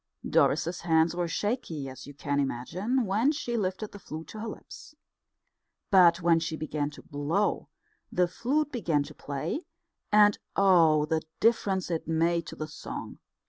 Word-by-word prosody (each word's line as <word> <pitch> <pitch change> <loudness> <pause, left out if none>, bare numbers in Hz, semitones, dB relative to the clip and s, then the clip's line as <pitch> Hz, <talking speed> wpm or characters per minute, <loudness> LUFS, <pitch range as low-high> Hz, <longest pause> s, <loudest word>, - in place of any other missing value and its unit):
Doris's 175 +2 +2
hands 165 0 +3
were 175 -1 -1
shaky, 165 - -2
as 130 +1 -9
you 145 - -11
can 145 0 -1
imagine, 180 - -1
when 215 +8 +2
she 245 -5 -3
lifted 205 0 -2
the 205 - -10
flute 160 -3 -8
to 215 - -8
her 225 - -4
lips. 260 +6 -10 1.0
But 175 -2 +6
when 170 -1 +5
she 160 -1 -3
began 150 -2 -2
to - - -12
blow, 155 +8 -1 0.4
the 180 -1 +2
flute 290 - -1
began 170 - 0
to - - -11
play; 155 - -4 0.4
and 210 -1 +5 0.2
oh, 165 -6 +5
the 160 +1 0 0.2
difference 195 -5 +2
it 165 -2 -2
made 165 +1 +1
to - - -7
the 155 - -5
song! 155 - -8
170 Hz, 160 wpm, -28 LUFS, 155-210 Hz, 1.0 s, But